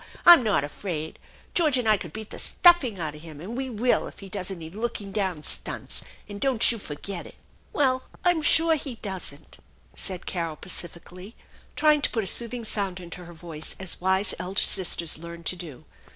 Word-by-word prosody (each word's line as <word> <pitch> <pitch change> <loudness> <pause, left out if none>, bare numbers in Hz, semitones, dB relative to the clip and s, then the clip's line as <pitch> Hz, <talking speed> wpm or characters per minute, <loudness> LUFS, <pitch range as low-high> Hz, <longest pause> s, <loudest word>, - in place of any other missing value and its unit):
I'm 345 -5 +11
not 210 -11 +2
afraid. 155 +1 -5 0.3
George 305 -6 +3
and 245 -3 0
I 215 - +6
could 175 -5 -7
beat 220 +4 -8
the - - -7
stuffing 295 - +4
out 155 -3 -2
of 150 - -11
him, 155 -3 -10
and 200 +9 -6
we 265 +1 -2
will 240 +1 +1
if - - -12
be 195 - -10
does 185 -1 -4
any 170 -4 -6
looking 210 +2 -4
down 190 -7 -1
stunts, - - -3 0.3
and 205 -1 -8
don't 260 -4 +4
you 230 - -4
forget 175 +2 -6
it! - - -14 0.2
" - - -32
" - - -33
Well, 260 -3 +2 0.2
I'm 350 -3 +4
sure 325 +1 +6
he 280 -5 -2
doesn't," 185 -8 -7 0.4
said 185 -2 -2
Carol 165 -3 -2
pacifically, 180 +4 -6 0.4
trying 300 -1 +4
to - - +2
put 225 - -1
a - - -4
soothing 235 +4 0
sound 195 -4 -2
into 175 0 -9
her 170 - -11
voice 160 -2 -6
as 190 -2 -3
wise 190 +2 +3
elder 185 +3 0
sisters 170 -4 +1
learn 170 0 -9
to 185 - 0
do. 165 -8 -8
195 Hz, 200 wpm, -26 LUFS, 170-235 Hz, 0.4 s, I'm